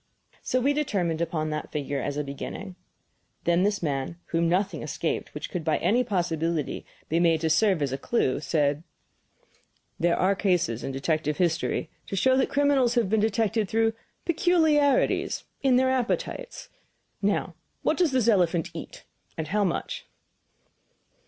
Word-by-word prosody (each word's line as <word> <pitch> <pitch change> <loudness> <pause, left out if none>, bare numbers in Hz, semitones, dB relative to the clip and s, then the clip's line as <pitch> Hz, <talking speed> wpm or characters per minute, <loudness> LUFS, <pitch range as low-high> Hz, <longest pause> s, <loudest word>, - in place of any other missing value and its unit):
So 255 - 0
we 275 +3 +2
determined 185 - -1
upon 155 -2 -1
that 150 0 -4
figure 140 -2 -2
as 145 +2 -3
a 150 - 0
beginning. 180 +7 -6 0.7
Then 170 +1 +3
this 200 -1 +1
man, 140 +2 -2
whom 165 0 +1
nothing 185 -2 0
escaped 150 +3 -3
which 150 - -5
could 175 - -3
by 155 -1 +1
any 245 +4 +2
possibility 170 - -1 0.2
be 165 - +1
made 165 -2 +3
to 160 -1 +1
serve 185 -2 +3
as 140 - -1
a 135 - -3
clue, 135 - 0
said: 145 0 +1 1.2
"There 170 0 +2
are 190 +2 +3
cases 180 - 0
in - - -3
detective 150 +2 -1
history 165 -2 0 0.2
to - - -4
show 260 +7 +3
that 265 - +2
criminals 280 -4 +3
have 225 -5 +1
been 220 - +3
detected 220 -1 +1
through 225 0 +2 0.3
peculiarities, 315 -5 +2 0.2
in 265 -2 +4
their 260 +1 +3
appetites. 260 - -2 0.5
Now, - - 0 0.3
what - - +2
does 350 -5 +3
this 255 -4 +2
elephant 175 -6 +2
eat, - - -9 0.3
and 155 -1 -4
how 210 +1 +2
much?" 185 - -3
180 Hz, 155 wpm, -26 LUFS, 155-235 Hz, 1.2 s, in